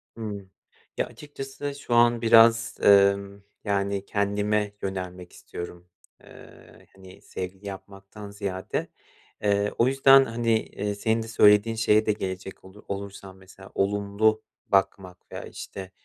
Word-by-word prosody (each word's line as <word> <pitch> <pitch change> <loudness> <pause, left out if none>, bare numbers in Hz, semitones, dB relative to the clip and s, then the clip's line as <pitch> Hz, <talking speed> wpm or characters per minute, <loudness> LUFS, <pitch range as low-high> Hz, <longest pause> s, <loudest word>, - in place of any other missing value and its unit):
Hımm. 100 -4 -7 0.5
Ya, - - +1
açıkçası 145 -1 -8
şu 140 -4 -5
an 120 0 +4
biraz, 115 0 +5
emm, 100 0 +4 0.2
yani, 100 -1 -1
kendime 105 0 -1
yönelmek 90 -2 -6
istiyorum. 85 0 -9 0.4
Eee, - - -16
hani, 95 -1 -15
sevgili 95 +2 -7
yapmaktan 100 +1 -10
ziyade. 100 -2 -4 0.6
Eee, 100 0 +1
o 120 - +3
yüzden, 135 0 +6
hani, 115 -1 0
eee, 105 0 -4
senin 110 +2 0
de - - -9
söylediğin 105 0 +4
şeye 110 -1 +3
de 105 - +2
gelecek 95 -1 -6
olu 95 +2 -15
olursam, 100 -1 -7
mesela 95 +1 -15
olumlu 105 +2 +1 0.2
bakmak 95 -2 -1
veya, - - -7
işte, 95 -1 -9
100 Hz, 125 wpm, -25 LUFS, 95-110 Hz, 0.6 s, yüzden